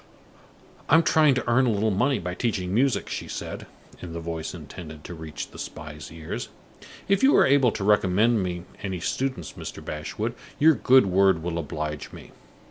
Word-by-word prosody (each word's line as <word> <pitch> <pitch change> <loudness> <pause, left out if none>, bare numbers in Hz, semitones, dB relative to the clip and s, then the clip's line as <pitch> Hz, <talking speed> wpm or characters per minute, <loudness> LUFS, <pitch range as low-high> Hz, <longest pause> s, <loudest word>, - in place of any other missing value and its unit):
"I - - +6
am 165 - +6
trying 155 -5 +4
to 125 - -2
earn 125 +2 +4
a - - +3
little 110 +1 +1
money 125 +7 +2
by 90 +1 -4
teaching 95 -3 -2
music," 130 +4 +2
she - - -5
said, - - -6 0.3
in 85 -2 -7
the 85 - -4
voice 80 0 -5
intended 80 -1 -10
to 90 - -8
reach 80 -2 -7
the - - -11
spy's 75 -2 -8
ears. 80 -1 -6 0.6
"If 195 0 +2
you 270 +2 +6
are - - +6
able 135 -3 +4
to 100 - -4
recommend 105 +2 +3
me 90 -2 -3 0.2
any 95 -3 -3
pupils, 130 +9 -2
Mr. - - -8
Bashwood, 105 +9 -4 0.2
your 160 +2 +6
good 130 -1 +5
word 95 -3 +3
will 85 -1 -2
oblige 75 -1 -4
me. - - -12
95 Hz, 185 wpm, -25 LUFS, 80-125 Hz, 0.6 s, I